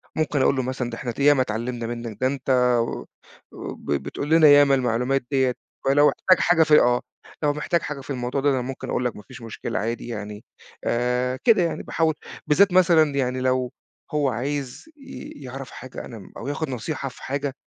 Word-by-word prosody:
ممكن 150 -3 0
أقول 140 - +3
له 130 - -1
مثلًا: 125 -1 -3
"ده 115 - -6
إحنا 125 - -5
ات - - -11
يا 145 +1 +6
ما 135 - +1
اتعلّمنا 120 0 -3
منك 115 -3 -6
ده 130 - +3
أنت 135 0 -4 0.3
و 115 - -3 0.5
وب - - -7
بتقول 75 - -3
لنا 160 -1 +6
يا 145 0 +8
ما 140 -1 +4
المعلومات 125 +1 0
ديّة 130 -2 +2 0.3
فلو 145 +2 +5
احتاج 185 -1 +3
حاجة 175 -2 +4
في 155 -1 +6
آه، 120 0 +3 0.4
لو 145 -1 +3
محتاج 170 +3 0
حاجة 145 -2 -5
في 135 - -15
الموضوع 125 0 -2
ده 145 - +3
أنا 130 -2 +1
ممكن 130 +1 -6
أقول 125 - -1
لك 120 - -1
ما - - -10
فيش 125 -2 -11
مشكلة 115 -1 -4
عادي 115 +3 -3
يعني" 105 -2 -6 0.4
آآ، 125 +2 0
كده 220 -6 +5
يعني 170 - -2
باحاول 160 -1 +1 0.3
بالذات 190 +5 +4
مثلًا 165 -5 +4
يعني 130 -1 -1
لو 130 -1 0 0.4
هو 145 -2 +2
عايز 130 +2 -4
ي 275 -2 -10
يعرَف 130 +1 -8
حاجة 130 +1 -9
أنا 115 -3 -9
م 95 - -14
أو 120 - -7
يآخد 145 +1 -3
نصيحة 135 +3 -4
في - - -15
حاجة 140 0 -3
130 Hz, 205 wpm, -23 LUFS, 125-145 Hz, 0.5 s, يا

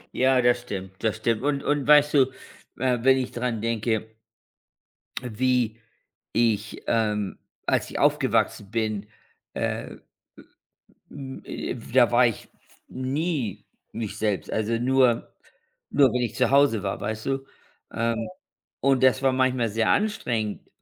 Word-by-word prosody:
Ja, 130 0 +3
das 120 0 +3
stimmt, 95 -5 -7
das 110 -1 +1
stimmt. 110 0 0
Und 140 0 0
und 145 -2 0
weißt 150 0 +6
du, 140 -3 +6 0.5
äh, 125 -1 +1
wenn 130 +2 +5
ich 130 -1 -2
daran 120 -3 -2
denke 110 -1 -1 1.1
wie 125 -1 0 0.5
ich, 110 -2 0
ähm 105 -3 0 0.3
als - - +1
ich - - -5
aufgewachsen 100 -1 +1
bin, 110 -2 -2 0.5
äh, - - -3 1.1
hm, 135 -2 -8
äh, - - -4
da 120 +1 +2
war 125 +1 +6
ich 115 - -4 0.4
nie 130 - -3 0.3
mich 110 -2 -5
selbst, 105 -3 -1
also 110 +1 0
nur 125 -1 +2 0.6
nur 140 -3 +4
wenn 125 - 0
ich 120 -3 -2
zu 125 -2 +2
Hause 140 -6 +4
war, 95 - -3
weißt 110 +1 -4
du, 135 0 -2 0.5
ähm, 115 0 -1 0.5
und 135 -1 +2
das 130 +1 +4
war 135 -1 +3
manchmal 130 -3 +1
sehr 110 +1 +1
anstrengend. 120 - -1
120 Hz, 135 wpm, -25 LUFS, 110-130 Hz, 1.1 s, weißt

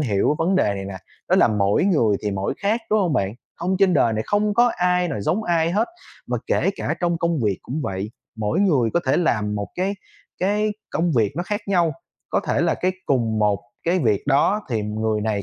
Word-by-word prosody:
hiểu 110 0 +1
vấn 175 +4 +1
đề 100 - +2
này 95 - -5
nè, 95 -1 -6 0.3
đó - - +4
là - - +5
mỗi 105 - +2
người 120 - +3
thì 105 - -1
mỗi 95 0 -2
khác, 215 +4 0
đúng 215 0 +4
hông 175 -6 +1
bạn? 100 -4 0 0.2
Hông 185 +2 -1
trên 195 -2 +4
đời 115 -6 +3
này 110 - -1
không 205 0 +1
có 240 +1 +4
ai 180 0 +2
nào 140 -10 -3
giống 175 - 0
ai 165 -2 +1
hết. 210 +6 +1 0.4
Mà - - -1
kể - - +2
cả - - -2
trong 170 -2 0
công 170 -1 0
việc 100 -3 +1
cũng 145 +5 -4
vậy, 95 -1 -3 0.3
mỗi 110 - 0
người 140 - +3
có 175 - +3
thể 135 - +3
làm 105 -11 +1
một 100 -2 -3
cái 190 +2 -1 0.4
cái 210 +3 +1 0.2
công 165 0 0
việc 110 -5 +2
nó 175 - 0
khác 205 +3 -3
nhau, 175 -5 +2 0.4
có - - +2
thể - - +1
là 170 0 +2
cái 185 +1 0
cùng 115 -5 +1
một 105 -2 +2 0.2
cái 175 +2 +2
việc 110 - +1
đó 145 +9 +3
thì 115 -3 -1
người 110 +1 -1
này 105 -2 -1
150 Hz, 230 wpm, -22 LUFS, -, 0.4 s, là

